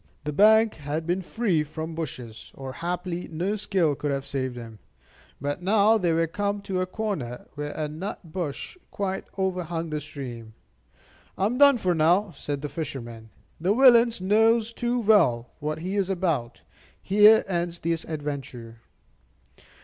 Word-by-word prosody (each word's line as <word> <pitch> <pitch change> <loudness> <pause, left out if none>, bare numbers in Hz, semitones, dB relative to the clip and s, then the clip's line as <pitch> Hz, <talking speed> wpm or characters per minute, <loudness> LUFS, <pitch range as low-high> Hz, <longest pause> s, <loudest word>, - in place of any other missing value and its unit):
The 150 0 -3
bank 220 +5 +5
had 150 +2 -4
been 175 +3 0
free 185 -4 0
from 160 +2 -6
bushes, 125 -8 -7
or 135 -1 -7
haply 175 +1 -4
no 175 +6 -2
skill 190 -7 +1
could 145 +1 -3
have 140 -1 -2
saved 130 -3 -3
him; 115 -3 -9 0.6
but 145 +5 -3
now 210 +3 +4
they 175 -3 +1
were 165 +1 +2
come 200 +5 -2
to 190 -2 -2
a 185 - -1
corner 185 - -4
where 145 0 -5
a 155 -1 -3
nut 160 +7 -5
bush 165 - -5
quite 190 -1 -3
overhung 175 -4 -2
the 150 -1 -2
stream. 120 -7 -8 0.8
"I 190 - +1
am 245 +5 -1
done 280 -2 +7
for 185 -5 +1
now," 175 +5 +3
said 145 -3 -5
the - - -1
fisherman; 120 -8 -6 0.3
"the 185 +6 +1
villain 245 -2 +7
knows 225 +3 +3
too 240 +1 -1
well 170 - +3
what 155 0 -3
he 185 +5 -4
is 195 -2 0
about. 165 -11 -1 0.4
Here 210 +3 +6
ends 175 -2 -2
this 165 -1 -2
adventure." 140 -7 -6
170 Hz, 155 wpm, -26 LUFS, 145-200 Hz, 0.8 s, done